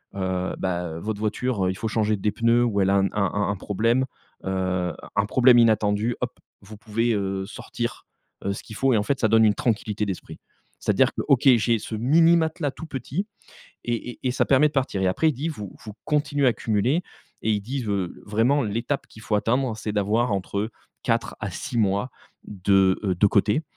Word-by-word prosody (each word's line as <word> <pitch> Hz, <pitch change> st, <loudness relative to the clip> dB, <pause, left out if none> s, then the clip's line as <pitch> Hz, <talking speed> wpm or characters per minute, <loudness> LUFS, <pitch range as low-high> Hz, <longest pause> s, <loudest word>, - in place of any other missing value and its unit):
heu 95 Hz, -1 st, -2 dB
ben, 90 Hz, -3 st, -2 dB
heu, -, -, -6 dB
votre 105 Hz, +3 st, -4 dB
voiture, 110 Hz, -2 st, -1 dB
il 95 Hz, -, -2 dB
faut 110 Hz, -, -3 dB
changer 110 Hz, -1 st, +1 dB
des 105 Hz, +2 st, 0 dB
pneus 115 Hz, +1 st, +3 dB
ou 100 Hz, -4 st, +1 dB
elle 95 Hz, -, +2 dB
a 100 Hz, -, +3 dB
un 100 Hz, 0 st, +3 dB
un 100 Hz, -3 st, 0 dB, 0.2 s
un -, -, -2 dB
problème, 115 Hz, +7 st, +1 dB, 0.4 s
heu, 95 Hz, -2 st, -1 dB, 0.2 s
un 100 Hz, -, +2 dB
problème 125 Hz, +1 st, +6 dB
inattendu, 110 Hz, 0 st, +2 dB
hop 125 Hz, 0 st, -1 dB, 0.3 s
vous 105 Hz, +2 st, -12 dB
pouvez, 115 Hz, +2 st, 0 dB
heu, 95 Hz, -2 st, -2 dB
sortir, 120 Hz, +2 st, -5 dB, 0.4 s
heu, 100 Hz, -, +1 dB
ce -, -, -8 dB
qu'il 110 Hz, -, -10 dB
faut». 135 Hz, +4 st, +2 dB
Et -, -, +4 dB
en 105 Hz, -, +1 dB
fait, 135 Hz, +4 st, -1 dB
ça 110 Hz, -, +3 dB
donne 110 Hz, 0 st, +5 dB
une 105 Hz, -, +4 dB
tranquillité 105 Hz, -2 st, -1 dB
d'esprit. 95 Hz, -3 st, -6 dB, 0.4 s
C'est-à-dire -, -, +2 dB
que: -, -, -3 dB
«OK, 135 Hz, -4 st, +4 dB
j'ai 115 Hz, +1 st, +2 dB
ce 110 Hz, -, -8 dB
mini 165 Hz, +9 st, +4 dB
matelas 160 Hz, -2 st, -1 dB
tout 165 Hz, -, -9 dB
petit, 145 Hz, -, -4 dB, 0.6 s
et 120 Hz, 0 st, -2 dB
et -, -, -17 dB
et -, -, +3 dB
ça 125 Hz, -, +1 dB
permet 140 Hz, +2 st, +5 dB
de -, -, -12 dB
partir». 130 Hz, -9 st, -1 dB
Et 95 Hz, -, +2 dB
après 125 Hz, +13 st, +2 dB
il -, -, -2 dB
dit: 150 Hz, +6 st, -3 dB
«Vous 105 Hz, -, -6 dB
vous 105 Hz, -, -7 dB
continuez 145 Hz, -2 st, +1 dB
à 125 Hz, -, +5 dB
cumuler» 120 Hz, -, 0 dB, 0.4 s
et 110 Hz, -, +1 dB
il 105 Hz, -, 0 dB
dit: 125 Hz, +4 st, -4 dB, 0.4 s
«Vraiment 120 Hz, +7 st, +2 dB
l'étape 115 Hz, +6 st, -2 dB
qu'il 110 Hz, -, -14 dB
faut 110 Hz, -, -2 dB
atteindre 120 Hz, +2 st, 0 dB
c'est 110 Hz, -1 st, -4 dB
d'avoir 105 Hz, +3 st, +1 dB
entre 100 Hz, +3 st, -2 dB, 0.3 s
4 -, -, -1 dB
à -, -, -3 dB
6 120 Hz, -, -5 dB
mois 100 Hz, +3 st, +1 dB, 0.3 s
de, 95 Hz, -1 st, +2 dB
heu, 95 Hz, -2 st, +1 dB
de 95 Hz, +4 st, +4 dB
côté, 105 Hz, +8 st, +2 dB
110 Hz, 205 wpm, -24 LUFS, 100-125 Hz, 0.6 s, problème